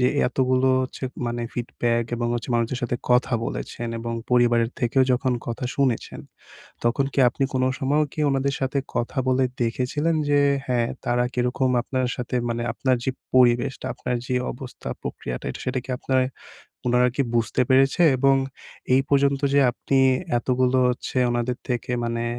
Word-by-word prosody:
যে 125 Hz, -, +4 dB, 0.2 s
এতগুলো 130 Hz, 0 st, +2 dB
হচ্ছে 130 Hz, +1 st, -6 dB, 0.2 s
মানে 120 Hz, 0 st, -2 dB
ফিডব্যাক 120 Hz, -1 st, -1 dB
এবং 120 Hz, 0 st, -1 dB
হচ্ছে 120 Hz, -, -4 dB
মানুষের 120 Hz, +2 st, 0 dB
সাথে 120 Hz, 0 st, -1 dB
কথা 125 Hz, 0 st, +3 dB
বলেছেন 120 Hz, 0 st, -5 dB
এবং 115 Hz, 0 st, -4 dB, 0.2 s
পরিবারের 120 Hz, -1 st, +3 dB
থেকেও 130 Hz, +2 st, +3 dB
যখন 125 Hz, +1 st, +1 dB
কথা 120 Hz, +1 st, -4 dB
শুনেছেন 130 Hz, -5 st, -1 dB, 0.6 s
তখন 125 Hz, +4 st, +2 dB
কি -, -, -2 dB
আপনি 135 Hz, +3 st, -1 dB
কোনো 130 Hz, 0 st, +2 dB
সময়ও 145 Hz, +3 st, +2 dB
কি 155 Hz, -, -5 dB
উনাদের 135 Hz, 0 st, 0 dB
সাথে 135 Hz, +1 st, 0 dB, 0.2 s
কথা 120 Hz, +3 st, -2 dB
বলে 130 Hz, 0 st, +3 dB, 0.2 s
দেখেছিলেন 130 Hz, +7 st, 0 dB, 0.2 s
যে, 145 Hz, 0 st, +4 dB, 0.3 s
হ্যাঁ। 120 Hz, -2 st, +1 dB, 0.2 s
তারা 120 Hz, 0 st, +2 dB
কিরকম 125 Hz, +1 st, +1 dB
আপনার 130 Hz, 0 st, -1 dB
সাথে 125 Hz, +1 st, -3 dB
মানে 115 Hz, 0 st, -2 dB
আপনার 130 Hz, -2 st, +1 dB
যে 130 Hz, -, +1 dB, 0.2 s
পরিবেশটা 125 Hz, 0 st, +3 dB
আপনার 125 Hz, -, -2 dB
যে 125 Hz, -, -1 dB, 0.2 s
অবস্থা 125 Hz, 0 st, -9 dB
প্রক্রিয়াটা 60 Hz, -, -5 dB
এটা -, -, -8 dB
সেটা 130 Hz, +1 st, 0 dB
কি 130 Hz, -, -7 dB
আপনার 130 Hz, -1 st, +1 dB, 0.7 s
উনারা 125 Hz, +1 st, +4 dB
কি 140 Hz, -, +3 dB
বুঝতে 115 Hz, +2 st, 0 dB
পেরেছে? 135 Hz, +6 st, +4 dB
এবং 135 Hz, +1 st, +4 dB, 0.6 s
এই 130 Hz, -, +5 dB
পর্যন্ত 140 Hz, 0 st, +3 dB
যে 140 Hz, -, +6 dB
আপনি 135 Hz, +2 st, 0 dB, 0.4 s
এতগুলো 130 Hz, +1 st, +1 dB
হচ্ছে 125 Hz, -, -5 dB
উনাদের 120 Hz, +1 st, -1 dB
থেকে 125 Hz, 0 st, -2 dB
মানে 115 Hz, 0 st, -2 dB
125 Hz, 160 wpm, -24 LUFS, 120-130 Hz, 0.7 s, যে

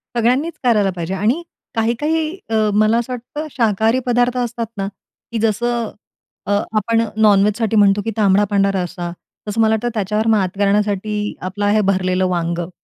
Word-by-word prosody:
सगळ्यांनीच 255 Hz, +8 st, +1 dB
करायला 215 Hz, -5 st, +3 dB
पाहिजे 170 Hz, +1 st, -4 dB
आणि 215 Hz, -, +1 dB, 0.3 s
काही-काही 240 Hz, +8 st, 0 dB, 0.3 s
अ, 225 Hz, -, 0 dB, 0.2 s
मला 215 Hz, +2 st, +3 dB
असं 240 Hz, +2 st, -2 dB
वाटतं 295 Hz, +6 st, -6 dB
शाकाहारी 225 Hz, 0 st, +2 dB
पदार्थ 245 Hz, 0 st, +1 dB
असतात 240 Hz, -1 st, -2 dB
ना, 195 Hz, 0 st, -2 dB, 0.4 s
की 230 Hz, -, -2 dB
जसं 230 Hz, +1 st, 0 dB, 0.6 s
अ, -, -, -1 dB, 0.3 s
आपण 225 Hz, +2 st, +2 dB, 0.2 s
नॉन 205 Hz, -2 st, +6 dB
वेजसाठी 215 Hz, +1 st, 0 dB
म्हणतो 205 Hz, -1 st, +4 dB
की 225 Hz, -, -1 dB
तांबडा 200 Hz, -1 st, +4 dB
पांढरा 200 Hz, -1 st, +2 dB
रस्सा, 175 Hz, -1 st, -5 dB, 0.4 s
तसं 215 Hz, +2 st, 0 dB
मला 220 Hz, 0 st, +4 dB
वाटतं 240 Hz, +2 st, -2 dB
त्याच्यावर 215 Hz, +1 st, -1 dB
मात 190 Hz, -3 st, +1 dB
करण्यासाठी, 210 Hz, +1 st, 0 dB
आपलं 200 Hz, +3 st, -3 dB
आहे 210 Hz, +1 st, +3 dB
भरलेलं 185 Hz, -1 st, +1 dB
वांगं. 170 Hz, -1 st, -2 dB
215 Hz, 160 wpm, -19 LUFS, 195-235 Hz, 0.6 s, नॉन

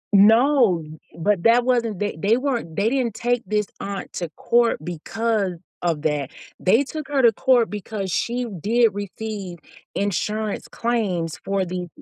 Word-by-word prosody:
No, 225 Hz, -, +5 dB, 0.3 s
but 190 Hz, +2 st, +1 dB
that 235 Hz, +2 st, +5 dB
wasn't 235 Hz, -5 st, +1 dB
they 205 Hz, -5 st, -2 dB
they 215 Hz, +6 st, +3 dB
weren't 245 Hz, -, -2 dB
they 200 Hz, +4 st, +1 dB
didn't 245 Hz, -3 st, 0 dB
take 245 Hz, 0 st, 0 dB
this 210 Hz, -1 st, +1 dB
aunt 200 Hz, 0 st, -5 dB
to 175 Hz, -3 st, -4 dB
court 235 Hz, 0 st, +2 dB
because 200 Hz, +3 st, -1 dB, 0.3 s
of 165 Hz, -4 st, -1 dB
that. 145 Hz, -3 st, 0 dB, 0.3 s
They 225 Hz, +9 st, +4 dB
took 305 Hz, 0 st, -6 dB
her 280 Hz, -2 st, +1 dB
to 235 Hz, -, +7 dB
court 245 Hz, -2 st, +3 dB
because 205 Hz, -1 st, -4 dB
she 245 Hz, +6 st, -1 dB, 0.2 s
did 230 Hz, +2 st, +3 dB
receive 205 Hz, -2 st, -5 dB, 0.4 s
insurance 210 Hz, +2 st, -2 dB
claims 195 Hz, -9 st, -1 dB
for 195 Hz, -1 st, 0 dB
the 180 Hz, 0 st, -4 dB
215 Hz, 150 wpm, -23 LUFS, 185-235 Hz, 0.4 s, to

